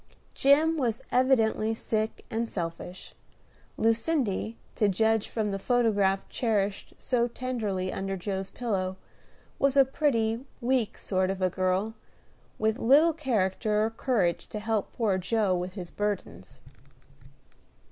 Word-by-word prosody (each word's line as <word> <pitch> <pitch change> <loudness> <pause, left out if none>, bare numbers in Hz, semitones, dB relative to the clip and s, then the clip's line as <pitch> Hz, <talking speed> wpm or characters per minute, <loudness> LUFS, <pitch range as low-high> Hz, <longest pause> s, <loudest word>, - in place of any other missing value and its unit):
Jim 305 +4 +4
was 235 -6 -1
evidently 225 -4 +3
sick 220 0 -2
and 225 +1 -1
selfish. 175 +1 -6 0.6
Lucindy, 225 -2 0 0.2
to 210 - +2
judge 220 +2 +1
from 215 -3 -1
the 195 - -3
photograph 205 -5 +2
cherished 205 -5 -1
so 240 -2 +1
tenderly 220 -7 -3
under 195 0 -3
Joe's 190 +1 -3
pillow, 190 -6 -2 0.6
was 275 0 +2
a 275 - +8
pretty, 235 -4 0 0.2
weak 245 -3 0
sort 185 -1 0
of 195 0 -2
a 185 -1 +1
girl, 185 +4 0 0.6
with 220 0 0
little 295 +7 +5
character 215 - 0
or 225 - -2
courage 220 -8 0
to 210 - -4
help 220 -1 -1
poor 205 -5 +1
Joe 200 0 +1
with 180 +1 -3
his 180 -4 -7
burdens. 190 - -4
220 Hz, 125 wpm, -28 LUFS, 190-240 Hz, 0.6 s, a